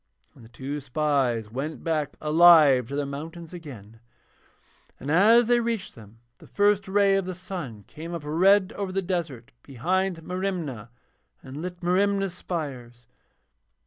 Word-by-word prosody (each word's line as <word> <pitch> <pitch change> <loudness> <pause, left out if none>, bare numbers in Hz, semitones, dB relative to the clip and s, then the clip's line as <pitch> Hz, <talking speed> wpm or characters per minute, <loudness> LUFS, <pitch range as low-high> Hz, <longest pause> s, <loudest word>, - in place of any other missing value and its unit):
And - - -17
the 110 - -15
two 135 +4 -5
spies 130 -5 -1
went 140 +6 -5
back 155 -3 -2
alive 155 -5 +6
to 140 - -5
their 145 0 -1
mountains 160 +4 -8
again, 115 - -11 1.0
and 145 - -4
as 220 +8 +6
they 240 +1 +3
reached 230 -4 -3
them 110 0 -15 0.2
the - - -16
first 205 0 +2
ray 200 0 +3
of 195 - -1
the 185 -1 -5
sun 170 - -7
came 165 +8 -8
up 165 - -6
red 190 +6 +3
over 200 -2 -4
the 195 +1 -2
desert 165 -10 -4
behind 175 +7 -2
Merimna 170 - -4 0.5
and 135 +3 -8
lit 180 0 -7
Merimna's 195 +1 +1
spires. 130 -10 -6
165 Hz, 145 wpm, -25 LUFS, 135-185 Hz, 1.0 s, alive